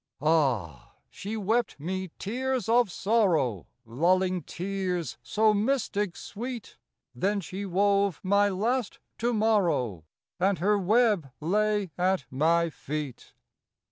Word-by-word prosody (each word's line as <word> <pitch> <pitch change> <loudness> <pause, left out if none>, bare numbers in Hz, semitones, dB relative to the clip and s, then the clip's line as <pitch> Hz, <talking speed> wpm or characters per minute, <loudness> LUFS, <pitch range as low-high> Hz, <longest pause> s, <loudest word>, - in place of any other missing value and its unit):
Ah! 130 - 0 0.2
she 215 +3 -5
wept 220 -2 0
me 185 +4 -3
tears 255 +2 -2
of 235 -3 +3
sorrow, 170 - +1 0.2
Lulling 180 +9 +1
tears 180 -6 -3
so 215 0 +2
mystic 210 -4 0
sweet; 240 +2 -7 0.4
Then 200 +2 0
she 195 +2 -6
wove 200 0 +2
my 200 +1 +3
last 225 +4 -1 0.2
to 240 +2 +1
morrow, 175 - +1 0.4
And 190 +1 +2
her 205 +3 +2
web 205 - +2
lay 205 +3 0
at 185 -6 +1
my 165 +5 +2
feet. 150 -3 -6
195 Hz, 110 wpm, -27 LUFS, 165-215 Hz, 0.4 s, of